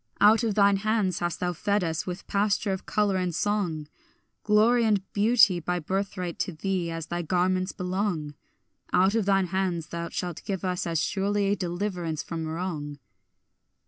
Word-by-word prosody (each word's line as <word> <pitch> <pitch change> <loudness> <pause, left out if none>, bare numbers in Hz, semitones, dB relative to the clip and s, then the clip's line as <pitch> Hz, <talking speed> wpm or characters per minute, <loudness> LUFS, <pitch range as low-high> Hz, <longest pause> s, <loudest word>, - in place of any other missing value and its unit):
Out 215 +3 +6
of 220 -3 0
thine 200 -1 +5
hands 210 -3 0
hast 175 -1 -2
thou 180 0 0
fed 200 +3 0
us 160 +1 -2
with 180 +1 -5
pasture 205 0 +1
of 190 - -6
colour 205 -2 +1
and 180 -3 -1
song; 180 -8 -1 0.6
Glory 220 +3 +4
and 210 -4 +2
beauty 210 -3 +5
by 180 +2 -2
birthright 185 0 -3
to - - -1
thee 180 +1 -2
as 165 -1 -4
thy 175 +1 -3
garments 185 +2 +1
belong; 180 -5 -2 0.6
Out 190 +2 +4
of 225 -3 +1
thine 195 -1 +3
hands 180 -4 -1
thou 170 0 -4
shalt 175 -3 -4
give 195 -1 -3
us 180 -1 -1
as 165 -2 0
surely 200 +3 +1
deliverance 175 -4 -3
from 165 -2 -4
wrong. 160 -3 -4
185 Hz, 165 wpm, -27 LUFS, 170-205 Hz, 0.6 s, Out